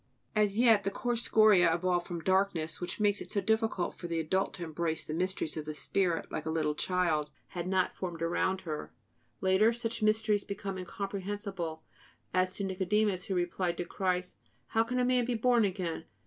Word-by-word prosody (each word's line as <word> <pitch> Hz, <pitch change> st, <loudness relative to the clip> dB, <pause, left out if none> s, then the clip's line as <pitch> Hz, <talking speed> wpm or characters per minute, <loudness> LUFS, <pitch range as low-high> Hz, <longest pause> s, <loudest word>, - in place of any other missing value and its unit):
As 210 Hz, -1 st, +2 dB
yet 225 Hz, -4 st, +5 dB
the 195 Hz, -, +1 dB
coarse 240 Hz, +3 st, -1 dB
scoria 210 Hz, -8 st, +5 dB
evolved 175 Hz, +1 st, 0 dB
from 170 Hz, -2 st, -5 dB
darkness, 185 Hz, -4 st, +1 dB
which 175 Hz, +3 st, -3 dB
makes 205 Hz, -1 st, +2 dB
it -, -, -8 dB
so 210 Hz, -, 0 dB
difficult 220 Hz, -2 st, 0 dB
for 175 Hz, -, -7 dB
the 165 Hz, -1 st, -1 dB
adult 190 Hz, +5 st, 0 dB
to 180 Hz, -, -6 dB
embrace 160 Hz, 0 st, -2 dB
the 155 Hz, -, -4 dB
mysteries 180 Hz, -2 st, -1 dB
of 155 Hz, -, -4 dB
the 155 Hz, 0 st, -5 dB
spirit 170 Hz, +3 st, 0 dB
like 155 Hz, -, -4 dB
a -, -, 0 dB
little 155 Hz, -2 st, 0 dB
child, 160 Hz, -3 st, 0 dB, 0.2 s
had 175 Hz, -1 st, -4 dB
not 185 Hz, -1 st, +1 dB
formed 170 Hz, -3 st, -4 dB
around 185 Hz, +3 st, 0 dB
her. 155 Hz, -4 st, -5 dB, 0.5 s
Later, 190 Hz, +4 st, +4 dB
such 235 Hz, -1 st, -2 dB
mysteries 215 Hz, -1 st, +2 dB
become 200 Hz, -1 st, -5 dB
incomprehensible; 195 Hz, -3 st, -4 dB, 0.5 s
as 185 Hz, 0 st, +2 dB
to 200 Hz, -, -4 dB
Nicodemus, 190 Hz, 0 st, 0 dB
who 190 Hz, -, -2 dB
replied 175 Hz, 0 st, -1 dB
to 175 Hz, -, -2 dB
Christ: 180 Hz, 0 st, -2 dB, 0.3 s
"How 225 Hz, 0 st, +3 dB
can 250 Hz, +2 st, -3 dB
a 250 Hz, -, +3 dB
man 250 Hz, 0 st, +3 dB
be 245 Hz, 0 st, -1 dB
born 235 Hz, -1 st, +4 dB
again? 180 Hz, -4 st, -3 dB
185 Hz, 190 wpm, -31 LUFS, 170-210 Hz, 0.5 s, yet